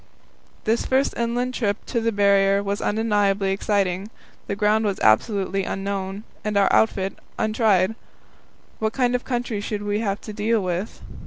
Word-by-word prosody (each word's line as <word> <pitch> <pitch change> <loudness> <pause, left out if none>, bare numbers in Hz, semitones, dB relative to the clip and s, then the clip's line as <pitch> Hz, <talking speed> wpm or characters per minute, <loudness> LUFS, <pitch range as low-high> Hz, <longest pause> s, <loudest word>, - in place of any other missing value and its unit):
This 225 +2 +1
first 265 +1 +1
inland 240 +2 -1
trip 205 -5 0 0.2
on 230 - +2
the 230 - +2
Barrier 200 -1 +3
was 200 +1 -2
undeniably 205 -2 +1
exciting. 195 -1 0 0.4
The 200 - -2
ground 210 +1 +2
was 200 -3 -1
absolutely 195 - +2
unknown, 195 +1 -3 0.2
and 210 -1 -1
our 200 -1 +3
outfit 195 -3 +1 0.2
untried. 215 -3 +2 0.9
What 220 0 -1
kind 250 -2 +1
of 250 - 0
country 240 -4 -2
should 205 0 -4
we 205 0 -1
have 200 -3 -1
to 215 - -8
deal 220 +2 +1
with? 185 +2 -3
205 Hz, 155 wpm, -23 LUFS, 195-225 Hz, 0.9 s, Barrier